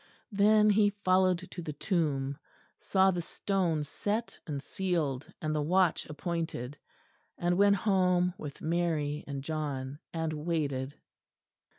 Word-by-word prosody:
Then 210 Hz, +1 st, +5 dB
he 205 Hz, 0 st, +4 dB
followed 185 Hz, -1 st, +3 dB
to 175 Hz, -, -6 dB
the 155 Hz, -2 st, -5 dB
tomb; 145 Hz, -4 st, -1 dB, 0.4 s
saw 190 Hz, 0 st, +3 dB
the 175 Hz, -1 st, -2 dB
stone 170 Hz, -3 st, -1 dB
set 210 Hz, +9 st, -3 dB
and 145 Hz, -3 st, -3 dB
sealed 150 Hz, -4 st, -2 dB
and 155 Hz, -1 st, -2 dB
the 150 Hz, -, 0 dB
watch 180 Hz, +2 st, +2 dB
appointed; 155 Hz, -5 st, -4 dB, 0.6 s
and 175 Hz, 0 st, +1 dB
went 200 Hz, +1 st, +5 dB
home 180 Hz, -3 st, +2 dB
with 145 Hz, -6 st, -8 dB
Mary 160 Hz, -3 st, 0 dB
and 140 Hz, -1 st, -4 dB
John, 145 Hz, -3 st, -3 dB
and 160 Hz, -1 st, -2 dB
waited. 150 Hz, -4 st, -2 dB
165 Hz, 125 wpm, -30 LUFS, 145-185 Hz, 0.6 s, Then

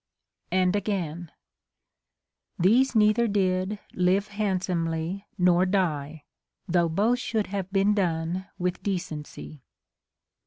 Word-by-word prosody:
And 185 Hz, +1 st, +2 dB
again: 175 Hz, -5 st, -3 dB, 0.6 s
— -, -, -61 dB, 0.5 s
These 240 Hz, +9 st, +4 dB
neither 215 Hz, +2 st, +4 dB
did 190 Hz, 0 st, 0 dB, 0.2 s
live 185 Hz, +3 st, +1 dB
handsomely 185 Hz, -2 st, -2 dB
nor 180 Hz, -1 st, +4 dB
die, 160 Hz, -6 st, -1 dB, 0.4 s
Though 170 Hz, -2 st, +2 dB
both 215 Hz, +9 st, +1 dB
should 220 Hz, -4 st, -1 dB
have 195 Hz, -1 st, -4 dB
been 195 Hz, +1 st, +3 dB
done 175 Hz, -1 st, -1 dB
with 180 Hz, -1 st, -2 dB
decency. 155 Hz, -6 st, -5 dB
185 Hz, 105 wpm, -26 LUFS, 170-205 Hz, 0.6 s, These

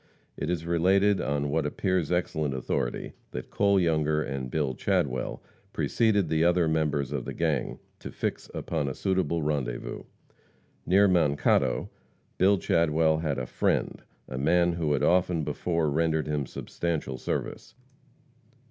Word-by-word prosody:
It 75 Hz, -, -4 dB
is 85 Hz, -2 st, -2 dB
related, 95 Hz, +4 st, +3 dB
on 70 Hz, 0 st, -1 dB
what 80 Hz, +1 st, +1 dB
appears 90 Hz, +2 st, -1 dB
excellent 80 Hz, -5 st, 0 dB
authority, -, -, -2 dB, 0.2 s
that 65 Hz, -, -6 dB
Cole 100 Hz, -1 st, +3 dB
Younger 80 Hz, -3 st, +1 dB
and 65 Hz, -2 st, -4 dB
Bill 70 Hz, -2 st, -1 dB
Chadwell 65 Hz, +1 st, -1 dB, 0.3 s
preceded 105 Hz, -5 st, +2 dB
the 80 Hz, +1 st, +1 dB
other 85 Hz, -1 st, +3 dB
members 75 Hz, -4 st, 0 dB
of -, -, -2 dB
the -, -, -6 dB
gang, 80 Hz, -5 st, -1 dB, 0.2 s
to -, -, -7 dB
fix -, -, -4 dB
upon 70 Hz, -, -2 dB
a 65 Hz, -, -5 dB
suitable 90 Hz, -4 st, 0 dB
rendezvous. 70 Hz, -5 st, -3 dB, 0.8 s
Near 100 Hz, +3 st, +5 dB
Mankato, 80 Hz, -6 st, +2 dB, 0.5 s
Bill 100 Hz, +2 st, +5 dB
Chadwell 80 Hz, -2 st, +2 dB
had 75 Hz, -4 st, -1 dB
"a 65 Hz, -, -2 dB
friend," -, -, -1 dB, 0.3 s
a 65 Hz, -, -5 dB
man 85 Hz, +4 st, +3 dB
who 80 Hz, -3 st, 0 dB
had 70 Hz, -, 0 dB
often 90 Hz, -2 st, +2 dB
before 85 Hz, +1 st, -1 dB
rendered 80 Hz, 0 st, +1 dB
him 75 Hz, -3 st, -2 dB
substantial 80 Hz, -7 st, -4 dB
service. -, -, -4 dB
80 Hz, 140 wpm, -27 LUFS, 70-90 Hz, 0.8 s, Near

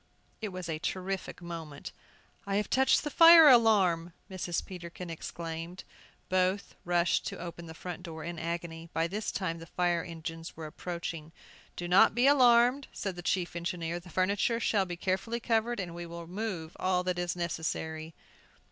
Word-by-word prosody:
It 215 Hz, -, -2 dB
was 185 Hz, -2 st, -6 dB
a 160 Hz, -2 st, -3 dB
terrific 185 Hz, +1 st, -4 dB
moment! 165 Hz, -4 st, -7 dB, 0.6 s
"I 195 Hz, -, 0 dB
have 210 Hz, +1 st, -1 dB
touched 265 Hz, 0 st, +4 dB
the 295 Hz, -, -3 dB
fire 330 Hz, 0 st, +9 dB
alarm," 195 Hz, -, +5 dB, 0.2 s
Mrs. 180 Hz, -2 st, -2 dB
Peterkin 175 Hz, -1 st, -8 dB
exclaimed. 165 Hz, +2 st, -6 dB, 0.4 s
Both 185 Hz, +2 st, 0 dB
rushed 175 Hz, 0 st, +2 dB
to -, -, -5 dB
open 170 Hz, -1 st, -7 dB
the 160 Hz, -, -9 dB
front 180 Hz, +1 st, -7 dB
door 160 Hz, -3 st, -7 dB
in 170 Hz, 0 st, -5 dB
agony. 165 Hz, 0 st, -5 dB
By 165 Hz, -, +1 dB
this 205 Hz, +5 st, -3 dB
time 170 Hz, -4 st, -3 dB
the 165 Hz, -, -10 dB
fire 175 Hz, 0 st, +1 dB
engines 165 Hz, -1 st, -7 dB
were 160 Hz, -, -6 dB
approaching. 165 Hz, 0 st, -6 dB, 0.4 s
"Do 175 Hz, -, -4 dB
not 195 Hz, +5 st, +6 dB
be 245 Hz, +2 st, +3 dB
alarmed," 255 Hz, -1 st, +5 dB
said 195 Hz, -3 st, -4 dB
the 175 Hz, -, -7 dB
chief 175 Hz, 0 st, -1 dB
engineer; 170 Hz, 0 st, -3 dB
"the 180 Hz, +1 st, -14 dB
furniture 200 Hz, +6 st, +1 dB
shall 205 Hz, -4 st, +2 dB
be 175 Hz, -1 st, -5 dB
carefully 195 Hz, +6 st, -1 dB
covered, 230 Hz, 0 st, 0 dB
and 175 Hz, -3 st, -4 dB
we 170 Hz, 0 st, -6 dB
will 170 Hz, 0 st, -8 dB
move 180 Hz, -3 st, -5 dB
all 185 Hz, -1 st, +1 dB
that 180 Hz, -1 st, -1 dB
is 175 Hz, 0 st, -1 dB
necessary." 160 Hz, -2 st, -3 dB
175 Hz, 170 wpm, -30 LUFS, 165-195 Hz, 0.6 s, fire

